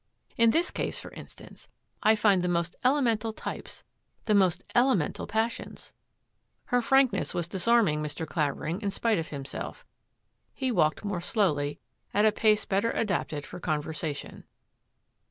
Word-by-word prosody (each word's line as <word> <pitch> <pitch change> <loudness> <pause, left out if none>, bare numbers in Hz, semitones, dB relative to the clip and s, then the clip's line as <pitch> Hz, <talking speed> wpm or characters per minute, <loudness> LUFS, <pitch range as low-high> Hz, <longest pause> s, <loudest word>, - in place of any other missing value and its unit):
In 230 0 +5
this 335 +9 +2
case, - - -3
for - - -9
instance, - - -12 0.3
I 215 +1 +5
find 205 -3 +3
the 180 - -1
most 170 0 -1
ele 275 +3 +3
mental 225 -2 0
types, - - -7 0.4
the 215 - +2
most 190 -4 +3
elemental 240 - +2
passions." 225 +2 -3 0.7
Her 245 -1 +2
frankness 270 +1 +2
was 170 -1 -1
disarming 190 -4 +2
Mr. 150 +2 -4
Clavering 155 +4 -2
in 205 - -1
spite 220 +1 +1
of 165 - -4
himself. 140 -1 -7 0.7
He 260 -2 -1
walked 160 -2 +1
more 195 -4 -2
slowly, 150 -7 0 0.4
at 205 +1 +4
a 215 - +6
pace 215 0 +2
better 200 +4 +1
adapted 170 -10 -2
for 180 - -9
conversation. 155 -2 -4
195 Hz, 145 wpm, -28 LUFS, 160-225 Hz, 0.7 s, a